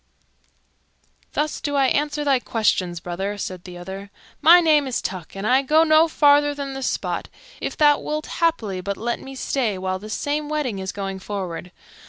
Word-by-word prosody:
"Thus 300 Hz, +1 st, -1 dB
do 290 Hz, -2 st, -2 dB
I 275 Hz, -1 st, +4 dB
answer 295 Hz, +2 st, 0 dB
thy 275 Hz, -3 st, +3 dB
questions, 185 Hz, -7 st, 0 dB
brother," 190 Hz, +4 st, -4 dB
said 185 Hz, -2 st, -6 dB
the 180 Hz, -1 st, -9 dB
other. 190 Hz, +3 st, -8 dB, 0.3 s
"My 335 Hz, +4 st, +8 dB
name 305 Hz, -4 st, +3 dB
is 255 Hz, -, -1 dB
Tuck, 185 Hz, -2 st, -6 dB
and 195 Hz, +1 st, -5 dB
I 255 Hz, +4 st, +4 dB
go 305 Hz, +4 st, +4 dB
no 315 Hz, 0 st, +5 dB
farther 290 Hz, -2 st, +4 dB
than 280 Hz, -1 st, -5 dB
this 270 Hz, -1 st, -3 dB
spot, -, -, -3 dB, 0.3 s
if -, -, -4 dB
thou 295 Hz, -1 st, +5 dB
wilt 305 Hz, +1 st, -3 dB, 0.2 s
haply 225 Hz, -, +1 dB
but 200 Hz, +1 st, -3 dB
let 235 Hz, +1 st, -2 dB
me 270 Hz, 0 st, -9 dB
stay 245 Hz, -6 st, -1 dB
while 185 Hz, 0 st, -2 dB
this 215 Hz, +2 st, -5 dB
same 295 Hz, 0 st, -2 dB
wedding 285 Hz, -10 st, -2 dB
is 190 Hz, -1 st, -4 dB
going 195 Hz, -1 st, -5 dB
forward. 185 Hz, -3 st, -5 dB
255 Hz, 185 wpm, -22 LUFS, 190-295 Hz, 0.3 s, My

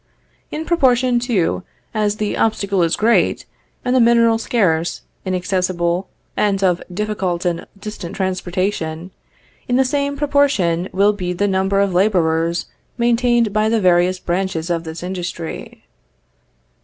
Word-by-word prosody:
In 315 Hz, +1 st, -5 dB
proportion, 255 Hz, -7 st, +3 dB
too, 230 Hz, -10 st, 0 dB, 0.3 s
as 210 Hz, -1 st, 0 dB
the 210 Hz, -1 st, -2 dB
obstacle 200 Hz, -4 st, +1 dB
is 165 Hz, 0 st, +2 dB
great, 230 Hz, +2 st, +2 dB, 0.4 s
and 250 Hz, +1 st, +1 dB
the -, -, +5 dB
mineral 230 Hz, -1 st, +4 dB
scarce, 175 Hz, -9 st, 0 dB, 0.2 s
inaccessible, 180 Hz, -1 st, -1 dB, 0.3 s
and 200 Hz, -2 st, +1 dB
of 180 Hz, -2 st, +2 dB
difficult 190 Hz, -3 st, -2 dB
and 170 Hz, -1 st, -2 dB
distant 200 Hz, -3 st, -7 dB
transportation, 185 Hz, -2 st, -2 dB, 0.6 s
in 245 Hz, -, +1 dB
the 265 Hz, +1 st, +4 dB
same 280 Hz, +1 st, -1 dB
proportion 270 Hz, -, +1 dB
will 200 Hz, +2 st, +3 dB
be 180 Hz, -3 st, -3 dB
the 200 Hz, +3 st, 0 dB
number 190 Hz, 0 st, +1 dB
of 200 Hz, -2 st, +1 dB
laborers 170 Hz, -3 st, +1 dB, 0.3 s
maintained 240 Hz, -2 st, +2 dB
by 215 Hz, 0 st, +2 dB
the 225 Hz, 0 st, +2 dB
various 180 Hz, -1 st, +3 dB
branches 180 Hz, -2 st, -2 dB
of 165 Hz, -1 st, -1 dB
this 160 Hz, +2 st, -7 dB
industry. 180 Hz, -3 st, -6 dB
195 Hz, 130 wpm, -19 LUFS, 175-230 Hz, 0.6 s, the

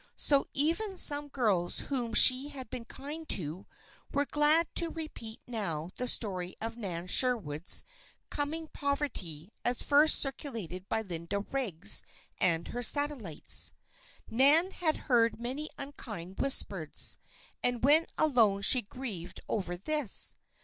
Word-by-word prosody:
So 280 Hz, -2 st, 0 dB
even 350 Hz, +8 st, -2 dB
some 290 Hz, -3 st, +6 dB
girls 210 Hz, -11 st, -1 dB
whom 240 Hz, -5 st, -3 dB
she 260 Hz, +5 st, +6 dB
had 265 Hz, -5 st, -10 dB
been 245 Hz, -2 st, -7 dB
kind 300 Hz, +6 st, -9 dB
to, 165 Hz, +2 st, -3 dB, 0.4 s
were 285 Hz, +1 st, -1 dB
glad 300 Hz, +3 st, +3 dB
to 335 Hz, -, +2 dB
repeat 310 Hz, -9 st, -8 dB
now 185 Hz, -9 st, -5 dB
the 250 Hz, -, -4 dB
story 185 Hz, -6 st, -1 dB
of 225 Hz, +1 st, -6 dB
Nan 180 Hz, -7 st, -6 dB
Sherwood's 185 Hz, -, +3 dB, 0.5 s
coming 310 Hz, +3 st, -4 dB
poverty 225 Hz, -, -4 dB
as 245 Hz, 0 st, 0 dB
first 295 Hz, +2 st, +4 dB
circulated 225 Hz, -, -4 dB
by 220 Hz, -, -2 dB
Linda 175 Hz, +1 st, -5 dB
Riggs 210 Hz, -8 st, -1 dB, 0.4 s
and 170 Hz, -2 st, 0 dB
her 245 Hz, -, -6 dB
satellites. 255 Hz, -, +1 dB, 0.5 s
Nan 290 Hz, +10 st, +3 dB
had 320 Hz, -5 st, -2 dB
heard 230 Hz, -4 st, +1 dB
many 265 Hz, +6 st, -5 dB
unkind 210 Hz, -10 st, -9 dB
whispers, 195 Hz, -, +3 dB, 0.4 s
and 245 Hz, -1 st, -2 dB
when 305 Hz, +5 st, +3 dB
alone 225 Hz, -10 st, +1 dB
she 255 Hz, -, +8 dB
grieved 200 Hz, -6 st, -9 dB
over 180 Hz, -4 st, -4 dB
this. 295 Hz, +3 st, +3 dB
245 Hz, 130 wpm, -29 LUFS, 190-290 Hz, 0.5 s, she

